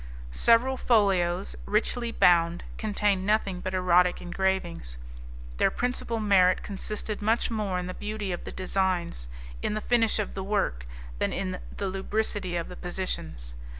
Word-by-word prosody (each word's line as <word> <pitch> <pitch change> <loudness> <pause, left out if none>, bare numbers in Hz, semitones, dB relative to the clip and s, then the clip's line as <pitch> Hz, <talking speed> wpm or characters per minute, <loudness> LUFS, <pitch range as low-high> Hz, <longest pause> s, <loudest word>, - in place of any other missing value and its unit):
Several 235 - +4
folios, 195 -6 +2
richly 230 +3 0
bound, 170 -3 +4 0.2
contained 205 -3 +1
nothing 200 -2 +1
but 185 +1 -3
erotic 180 -1 +4
engravings. 175 - -2 0.6
Their - - +4
principal 245 -2 -1
merit 190 -4 +4
consisted 210 +1 -4
much 225 +3 +1
more 210 -4 -1
in 180 - -2
the 185 - -5
beauty 210 -1 -4
of 175 - -4
the - - -6
designs, 185 - -1 0.3
in - - -1
the - - 0
finish 230 0 +2
of 210 - -2
the 190 - -4
work, 125 - -1 0.3
than - - +1
in 185 -1 -3 0.2
the 200 - -2
lubricity 195 -1 -1
of 170 -1 -2
the 180 - -9
positions. 80 - -4
190 Hz, 150 wpm, -27 LUFS, 180-215 Hz, 0.6 s, Several